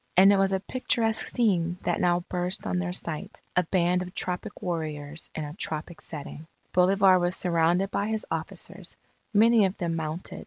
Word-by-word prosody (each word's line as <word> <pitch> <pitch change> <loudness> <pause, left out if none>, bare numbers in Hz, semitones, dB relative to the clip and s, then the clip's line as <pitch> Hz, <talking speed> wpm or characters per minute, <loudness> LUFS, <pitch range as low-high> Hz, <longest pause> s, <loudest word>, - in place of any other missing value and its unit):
And 195 +2 +8
it - - +3
was 195 0 +3
a 190 - +1
picturesque 225 0 0
scene 180 -7 +1
that 175 - 0
now 175 0 +3
burst 180 +1 -2
on 180 - 0
their 180 -1 -2
sight 165 -4 -4 0.2
a 180 - +5
band 180 +1 +1
of 180 0 -7
tropic 180 +4 -3
warriors 155 -3 -4
in 155 - -3
a 145 - -7
tropic 160 -2 -4
setting. 155 0 -8 0.3
Bolivar 190 +1 +5
was 175 +1 0
surrounded 175 +2 +1
by 200 - -1
his 220 -1 -2
officers, 180 +2 -5 0.4
many 225 +1 +5
of 190 +1 -2
them 170 -3 -2
mounted. 160 +2 -4
180 Hz, 180 wpm, -27 LUFS, 165-195 Hz, 0.4 s, And